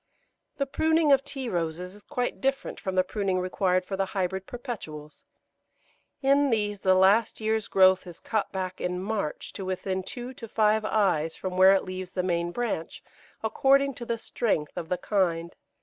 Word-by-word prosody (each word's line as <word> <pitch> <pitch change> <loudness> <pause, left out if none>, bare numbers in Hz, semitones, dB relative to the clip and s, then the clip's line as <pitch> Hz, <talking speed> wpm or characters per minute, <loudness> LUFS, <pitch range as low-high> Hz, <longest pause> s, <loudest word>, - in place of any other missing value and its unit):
The 275 - 0
pruning 315 +2 +2
of 275 -1 +5
Tea 275 -2 -5
Roses 175 -1 -3
is 205 - -14
quite 250 +2 -3
different 270 0 -1
from 190 -1 -3
the 185 - +4
pruning 195 -1 -1
required 185 0 +1
for 195 - -3
the 195 0 0
Hybrid 190 +1 -1
Perpetuals. 175 - -8 1.0
In 280 +1 +4
these 210 -3 0
the 190 0 +4
last 200 +4 +4
year's 220 -1 0
growth 190 -1 +4
is 175 - -10
cut 215 -2 -2
back 185 -1 -4
in 180 0 -1
March 195 -5 -3
to 195 - -6
within 185 0 -2
two 245 +7 -7
to 235 -2 -9
five 215 0 +2
eyes 180 -8 +1
from 185 -1 -5
where 190 +1 +7
it 195 - +1
leaves 185 -1 -6
the 180 - -1
main 170 -1 0
branch, 205 -6 -3 0.4
according 275 +5 +3
to 240 - -8
the 235 - -1
strength 205 -9 -1
of 170 -2 -5
the 180 - 0
kind. 170 -3 0
195 Hz, 180 wpm, -27 LUFS, 185-230 Hz, 1.0 s, where